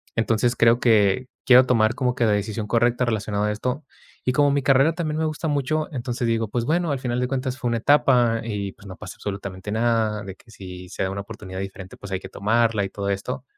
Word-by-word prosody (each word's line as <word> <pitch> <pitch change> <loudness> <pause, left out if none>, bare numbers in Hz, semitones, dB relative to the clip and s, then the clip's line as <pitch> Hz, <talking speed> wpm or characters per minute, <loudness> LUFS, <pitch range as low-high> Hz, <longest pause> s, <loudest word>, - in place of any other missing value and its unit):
Entonces, 115 +2 +1
creo 115 +1 +4
que 110 0 +3 0.2
quiero 125 0 +7
tomar 115 -3 +3
como 125 -1 0
que 120 - 0
la 110 - +3
decisión 105 +1 -2
correcta, 120 +2 +2
relacionada 105 -2 -1
a - - 0
esto. 125 +7 -3 0.4
Y 125 - +2
como 145 +2 +4
mi 140 -1 0
carrera 135 +5 +4
también 155 -3 -3
me 160 - +1
gusta 155 +1 -2
mucho, 150 +2 -1
entonces 120 -1 -3
digo: 115 -1 0
"Pues, 120 +1 -1
bueno, 170 +3 +1
al 135 - -3
final 125 -1 -2
de 125 - 0
cuentas 130 0 -2
fue 125 - -2
una 115 - 0
etapa 120 -2 +3
y, 100 -3 -3
pues, 100 - -15
no 95 - -8
pasa 100 -4 -9
absolutamente 100 -1 -6
nada, 110 -2 +1
de 95 -2 -8
que 115 - -23
si 90 -3 -10
se - - -3
da 95 - -1
una 100 +1 -4
oportunidad 100 -3 -8
diferente, 95 -1 -8
pues, 100 - -10
hay 95 - -1
que 95 - -9
tomarla", 110 +1 +1
y - - -5
todo 100 0 -4
esto, 100 +5 -3
115 Hz, 235 wpm, -23 LUFS, 100-125 Hz, 0.4 s, quiero